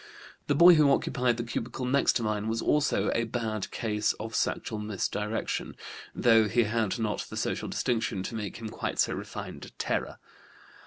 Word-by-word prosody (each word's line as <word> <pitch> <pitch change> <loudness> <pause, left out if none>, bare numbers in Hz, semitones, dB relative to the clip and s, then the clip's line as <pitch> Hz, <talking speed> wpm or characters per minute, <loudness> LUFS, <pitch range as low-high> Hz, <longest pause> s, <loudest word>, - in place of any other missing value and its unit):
The 145 - +2
boy 175 +5 +9
who 155 -3 +5
occupied 125 -3 +1
the 120 - -2
cubicle 120 +2 -4
next 140 +2 +3
to 120 - -1
mine 110 -1 -1
was 115 +1 -1
also 150 +4 +2
a 115 - +1
bad 110 -3 -3
case 105 -2 0
of 110 +1 -7
sexual 110 -1 -1
misdirection, 105 +1 -3 0.4
though 115 -2 +5
he 120 +4 +3
had 110 -2 0
not 110 -2 -1
the - - -7
social - - -2
distinction 110 -6 -1
to - - -5
make 105 -3 -4
him 110 -1 -6
quite - - -4
so - - +2
refined - - -7
a - - -11
terror. - - -3
115 Hz, 175 wpm, -28 LUFS, 105-120 Hz, 0.4 s, boy